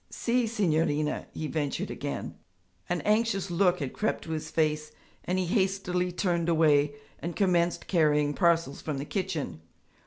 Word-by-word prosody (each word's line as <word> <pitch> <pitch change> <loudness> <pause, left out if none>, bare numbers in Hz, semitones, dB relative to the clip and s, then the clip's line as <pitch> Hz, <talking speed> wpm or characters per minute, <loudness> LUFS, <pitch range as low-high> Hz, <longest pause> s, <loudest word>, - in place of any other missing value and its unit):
'Si, 240 0 0
signorina,' 160 -8 0
he 155 - -5
ventured 150 -2 -2
again. - - -4 0.6
An 175 0 0
anxious 210 -3 +1
look 180 +1 +3
had 140 -4 -3
crept 215 - -1
to 160 - -7
his 155 -1 -3
face 155 -1 0 0.3
and 180 - 0
he 185 - +1
hastily 185 -2 0
turned 175 -2 0
away 150 -3 +4 0.2
and 170 +1 -4
commenced 175 -3 +2
carrying 150 -4 +2
parcels 165 -4 +2
from 150 -3 -3
the 140 - -4
kitchen. 175 - -3
170 Hz, 150 wpm, -28 LUFS, 155-190 Hz, 0.6 s, away